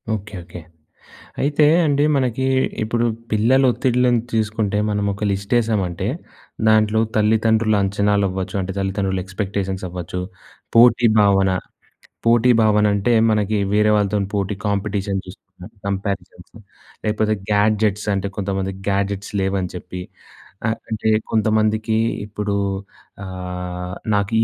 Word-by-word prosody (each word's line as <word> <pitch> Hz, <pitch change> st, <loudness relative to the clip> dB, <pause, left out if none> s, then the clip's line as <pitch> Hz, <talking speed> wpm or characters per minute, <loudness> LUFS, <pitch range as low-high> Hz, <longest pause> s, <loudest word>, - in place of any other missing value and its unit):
Okay. 105 Hz, 0 st, -8 dB
Okay. 85 Hz, +1 st, -10 dB, 0.8 s
అయితే 145 Hz, +2 st, +3 dB, 0.2 s
అండి 145 Hz, -1 st, +2 dB
మనకి 130 Hz, -1 st, 0 dB, 0.4 s
ఇప్పుడు 115 Hz, +2 st, 0 dB, 0.3 s
పిల్లల 115 Hz, +5 st, +3 dB
ఒత్తిడ్లని 125 Hz, -1 st, +2 dB
తీసుకుంటే 110 Hz, -2 st, 0 dB
మనమొక 100 Hz, 0 st, -1 dB
లిస్టేసామంటే, 100 Hz, -3 st, 0 dB, 0.6 s
దాంట్లో 110 Hz, 0 st, +4 dB, 0.2 s
తల్లిదండ్రుల 110 Hz, 0 st, +3 dB
అంచనాలవ్వచ్చు 100 Hz, -1 st, 0 dB
అంటే 95 Hz, +1 st, -4 dB
తల్లిదండ్రుల 95 Hz, -1 st, -1 dB
ఎక్స్‌పెక్టేషన్స్‌ 95 Hz, -1 st, -3 dB
అవ్వచ్చు, 90 Hz, 0 st, -5 dB, 0.5 s
పోటీ 120 Hz, +1 st, +6 dB
భావన, 95 Hz, -2 st, +4 dB, 0.8 s
పోటీ 120 Hz, +1 st, +5 dB
భావనంటే 105 Hz, +1 st, +3 dB, 0.2 s
మనకి 105 Hz, 0 st, +1 dB, 0.2 s
వేరే 105 Hz, 0 st, +4 dB
వాళ్ళతోని 100 Hz, -1 st, 0 dB
పోటీ, 100 Hz, 0 st, -1 dB
కాంపిటీషన్ 100 Hz, -1 st, -1 dB
చూస్తున్నాం. 95 Hz, 0 st, -13 dB, 0.2 s
కంపారిజన్స్ 95 Hz, -3 st, -4 dB, 0.5 s
లేపోతే 110 Hz, 0 st, +1 dB, 0.2 s
గ్యాడ్జెట్స్ 105 Hz, 0 st, +2 dB
అంటే 100 Hz, 0 st, -2 dB
కొంతమంది 95 Hz, -1 st, -2 dB, 0.2 s
గ్యాడ్జెట్స్ 100 Hz, 0 st, -1 dB
లేవని 95 Hz, -2 st, -1 dB
చెప్పి 90 Hz, 0 st, -7 dB, 0.6 s
ఆహ్, 110 Hz, 0 st, 0 dB
అంటే 110 Hz, 0 st, -2 dB, 0.2 s
కొంతమందికి 110 Hz, 0 st, +1 dB, 0.3 s
ఇప్పుడు 105 Hz, 0 st, -4 dB, 0.7 s
ఆహ్, 90 Hz, -1 st, -5 dB, 0.2 s
నాకు 100 Hz, +2 st, 0 dB
105 Hz, 105 wpm, -20 LUFS, 95-110 Hz, 0.8 s, పోటీ